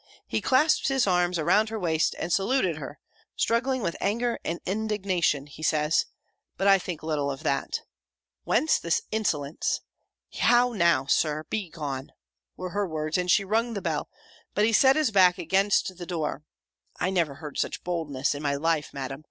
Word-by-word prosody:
he - - -2
clasped 290 +5 +3
his 270 -2 +2
arms 180 -2 +2
around 210 +7 +3
her 225 - -4
waist, 160 -4 +1
and 165 +1 -2
saluted 255 +8 +1
her, - - -8 0.4
struggling 250 +2 0
with 170 - -1
anger 235 +4 0
and 170 +1 -3
indignation, 190 -8 0
he 145 +1 -13
says; 155 0 +2 0.5
but 195 - +1
I 195 -1 +6
think 175 -4 -6
little 150 -3 -1
of 135 -1 -5
that! 140 - -1 0.6
"Whence 315 - +2
this 170 -1 0
insolence? 155 -9 -1 0.6
How, 245 0 +4
now, 170 -9 +3
Sir! 150 +2 +1
Begone!" 150 -9 -4 0.4
were 185 -1 -5
her 205 +1 -1
words, 155 -1 -3
and 180 0 0
she 195 +2 +4
rung 225 +3 0
the - - -1
bell; - - -2 0.5
but 210 - +3
he 225 - +1
set 265 +4 +6
his 305 -7 +2
back 185 -3 +5
against 190 +2 +1
the 175 -1 -8
door 160 -4 -3 0.6
(I 180 - 0
never 165 -7 0
heard 150 -1 -7
such - - -2
boldness 150 -7 -1
in 145 - -6
my 140 -1 0
life, 155 0 -1
Madam!) 135 0 -5
180 Hz, 170 wpm, -26 LUFS, 155-215 Hz, 0.6 s, I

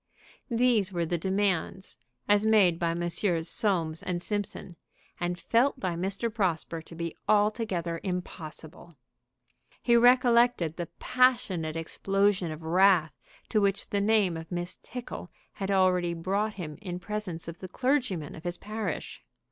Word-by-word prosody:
These 230 -5 +2
were 170 -2 -1
the 170 +1 -1
demands 190 0 -1 0.3
as 205 0 +4
made 205 -6 +4
by 170 -1 0
Messrs. 175 0 0
Soames 170 -8 0
& - - 0
Simpson, 205 -4 -3 0.4
and 175 0 -1
felt 250 +8 +2
by 185 -5 -1
Mr. 195 +6 -2
Prosper 170 -6 -1
to 165 - -13
be 170 0 -4
altogether 205 -6 +1
impossible. 170 -3 -6 0.9
He 235 - +4
recollected 240 - +4
the 175 -2 -4
passionate 210 -11 +2
explosion 195 +2 0
of 155 +1 -8
wrath 175 -1 +4 0.4
to 215 - +2
which 200 -1 0
the 200 - +1
name 200 -5 +3
of 165 +1 -9
Miss 175 0 -4
Tickle 245 -7 -7 0.2
had 195 -1 -4
already 180 -3 +2
brought 200 +5 -1
him 160 -5 -7
in 180 -4 -5
presence 185 -4 -5
of 170 +1 -7
the 185 - -7
clergyman 245 - -1
of 160 - -10
his 175 0 -3
parish. 210 -4 -5
185 Hz, 140 wpm, -28 LUFS, 170-210 Hz, 0.9 s, as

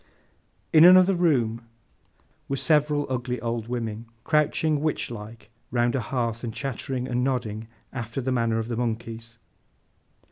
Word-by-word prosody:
In 155 0 +8
another 185 +2 +8
room, 130 -11 +1 0.9
were 135 - 0
several 150 -1 +2
ugly 125 -1 -2
old 115 -1 -3
women 115 -2 -4 0.2
crouching, 150 -1 +1
witch 155 -5 -1
like, 110 0 -10 0.2
round 120 0 +1
a - - +1
hearth, 115 -1 -2
and 120 - -3
chattering 130 0 -3
and 125 0 0
nodding, 115 -5 -2 0.3
after 115 -1 -4
the 130 0 -1
manner 115 -2 +1
of 115 0 -2
the 120 -1 -3
monkeys. 115 0 -4
120 Hz, 140 wpm, -25 LUFS, 115-135 Hz, 0.9 s, In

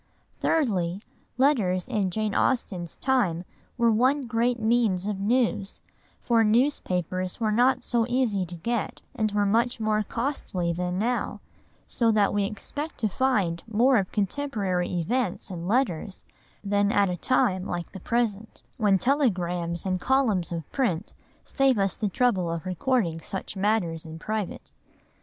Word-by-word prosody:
Thirdly, 195 - 0 0.3
letters 225 -10 +2
in 210 -7 0
Jane 215 +2 -1
Austen's 185 -10 0
time 200 -11 0 0.3
were 235 -1 +4
one 260 +6 +3
great 240 0 0
means 220 -5 +2
of 205 -2 -2
news, 215 -2 0 0.4
for 230 -2 +3
newspapers 185 - 0
were 220 -2 +1
not 245 +4 +3
so 235 -2 +1
easy 240 -6 +1
to 175 - -8
get, 230 +7 -3
and 215 -2 0
were 205 0 +1
much 230 +4 +1
more 215 -1 +1
costly 210 -7 -2
than 180 +1 -2
now, 240 +4 -1 0.5
so 230 -2 +1
that 205 -2 +3
we 205 -1 +1
expect 290 +10 -5
to 220 - +3
find 200 -9 +1
more 240 +4 +4
of 195 -3 -1
contemporary 200 -5 -1
events 190 +4 -1
in 175 -1 -5
letters 205 -5 -1 0.4
than 205 0 +2
at 200 -1 +3
a - - -1
time 185 -2 +1
like 175 -1 -4
the 190 - -8
present, 225 0 -2
when 205 -4 +3
telegrams 180 - 0
and 185 -1 -1
columns 235 -11 +1
of 165 -3 -4
print 215 -8 -1 0.3
save 270 -3 +2
us 195 -2 +1
the 210 - -1
trouble 190 -6 +1
of 165 +1 -4
recording 185 -2 0
such 190 +5 -5
matters 190 -5 0
in 160 0 -9
private. 215 +3 -4
210 Hz, 145 wpm, -26 LUFS, 185-240 Hz, 0.5 s, were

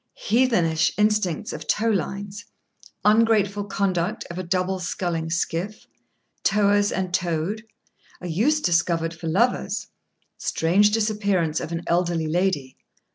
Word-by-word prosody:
—Heathenish 205 -9 +2
instincts 210 -6 +1
of 155 - -7
tow 225 +2 +1
lines.—Ungrateful 205 +2 -1
conduct 190 -2 -1
of 175 - -6
a - - -3
double 185 +1 -1
sculling 175 -2 -2
skiff.—Towers 200 +3 -1
and 185 -2 -2
towed.—A 180 +3 -4
use 240 - +1
discovered 165 - +1
for 165 0 -7
lovers.—Strange 195 -2 0
disappearance 205 -7 0
of - - -6
an 170 0 -3
elderly 170 -1 +1
lady. 155 -5 -1
185 Hz, 100 wpm, -24 LUFS, 170-210 Hz, -, Heathenish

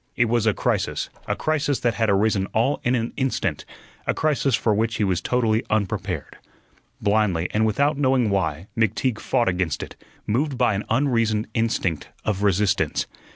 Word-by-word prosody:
It 125 - +3
was 115 -1 +1
a 105 - +4
crisis - - -1 0.2
a - - 0
crisis 145 -3 0
that 120 -1 +2
had 110 +2 0
arisen 100 -1 +2
all 120 +6 +1
in 125 +1 +2
an 115 -1 -2
instant; 125 - -1 0.4
a - - +1
crisis 140 -4 +1
for 110 -1 +1
which 110 +2 0
he 110 - 0
was 95 -3 +1
totally 115 -3 +1
unprepared. 105 -3 -2 0.6
Blindly, 100 -5 +1
and 110 +1 +2
without 140 +7 +1
knowing 130 -5 +2
why, 90 -4 -1
McTeague 115 +2 0
fought 120 -3 +1
against 90 -3 0
it, - - -10 0.3
moved 135 +5 0
by 120 -4 +3
an 100 +2 -3
unreasoned 115 -4 +1
instinct 95 -8 -1 0.2
of 100 -2 -1
resistance. 100 -1 +1
110 Hz, 165 wpm, -23 LUFS, 100-125 Hz, 0.6 s, a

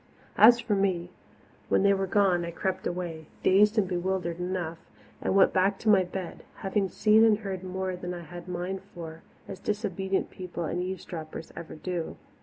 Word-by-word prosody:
As 235 +2 +9
for 230 -2 -1
me, 185 -3 0 0.6
when - - +3
they 200 0 +5
were 195 0 0
gone 185 -3 +3
I 170 - -3
crept 190 +2 -2
away, 170 -3 -4 0.2
dazed 210 +4 +5
and 205 -3 +3
bewildered 180 -1 -2
enough, 180 -2 -3 0.4
and - - 0
went 195 - +6
back 190 +1 +3
to 220 - -1
my 195 -3 +6
bed, 180 0 -6 0.2
having 195 0 +1
seen 215 +3 +5
and 220 -2 +5
heard 195 -3 -5
more 185 0 -3
than 180 0 -5
I 175 - -7
had 175 +2 -10
a - - -8
mind 180 +2 -3
for, 165 -1 -8 0.3
as 190 - -7
disobedient 195 -2 -1
people 180 -2 -6
and 170 +3 -2
eavesdroppers 175 -4 -6
ever 165 -1 -8
do. 170 +1 -4
185 Hz, 185 wpm, -28 LUFS, 175-195 Hz, 0.6 s, As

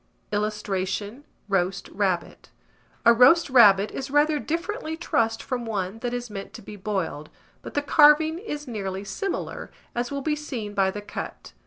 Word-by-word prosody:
[Illustration: 210 +3 -2 0.2
ROAST 195 -1 0
RABBIT.] 190 -3 -2 0.6
A 235 - +8
roast 265 +6 +5
rabbit 205 -5 +6
is 270 +1 -5
rather 295 +2 +3
differently 330 - -3
trussed 225 -9 0
from 250 -2 -3
one 205 -2 -3
that 245 +1 -3
is 245 0 -3
meant 200 -3 -8
to - - -9
be 210 - -9
boiled; 185 -7 -3 0.3
but - - -10
the 290 - +1
carving 310 +2 +5
is 295 -8 -6
nearly 195 -4 -4
similar, 275 - -4 0.2
as 240 0 -2
will 280 -1 -4
be 305 0 +1
seen 250 -9 -5
by 195 -1 +2
the 205 +2 -5
cut. - - -7
225 Hz, 160 wpm, -25 LUFS, 200-290 Hz, 0.6 s, A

